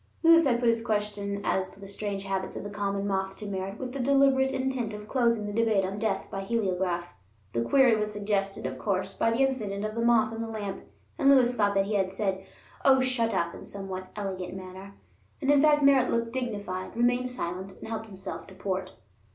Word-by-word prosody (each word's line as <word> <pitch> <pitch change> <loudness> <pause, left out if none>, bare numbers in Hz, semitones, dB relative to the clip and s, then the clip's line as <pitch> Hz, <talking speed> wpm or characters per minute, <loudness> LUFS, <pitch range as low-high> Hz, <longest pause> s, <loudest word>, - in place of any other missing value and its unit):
Lewis 330 -2 +7
had 240 -2 +2
put 240 - +1
his 230 0 +2
question 205 -2 -2
as 185 0 0
to - - -14
the 200 - -9
strange 200 0 -3
habits 195 -1 -3
of - - -5
the 205 - -6
common 200 -1 -2
moth 190 -1 -1
to 210 - -8
Merritt 195 0 -4
with 255 0 -5
the 275 - -4
deliberate 270 0 +4
intent 260 -5 -2
of 210 0 -9
closing 235 -4 +1
the 205 - -4
debate 220 -3 +2
on 195 +2 -4
death 205 -3 -1
by 195 - -3
heliograph. 185 -5 -1 0.4
The 115 - 0
query 250 - +5
was 210 0 -1
suggested, 200 -3 -2
of 130 0 -4
course, 190 -1 -1
by 225 - +1
the 240 +4 +3
incident 210 -6 -2
of 215 - -3
the 230 - -2
moth 230 -2 +3
in 225 - -4
the 230 - -3
lamp, 210 -3 -5 0.3
and 275 -2 +5
Lewis 255 -3 +6
thought 205 -4 +1
that 195 0 +3
he 210 - -3
had 190 -2 +1
said, 195 -1 -2 0.4
"Oh, 265 -1 +6
shut 255 -3 +1
up!" 170 -4 0
in - - -10
a - - -9
somewhat 190 -2 -6
elegant 190 -3 -4
manner. 190 +1 -9 0.4
And, 280 -1 +2
in 285 -1 +5
fact 295 -1 +5
Merritt 275 -2 +5
looked 230 0 -1
dignified, 205 -6 -4
remained 245 +1 +2
silent, 190 -5 -5
and - - -10
helped 220 0 -4
himself 190 -2 -8
to 190 - -13
port. 190 -1 -3
210 Hz, 220 wpm, -28 LUFS, 195-240 Hz, 0.4 s, Lewis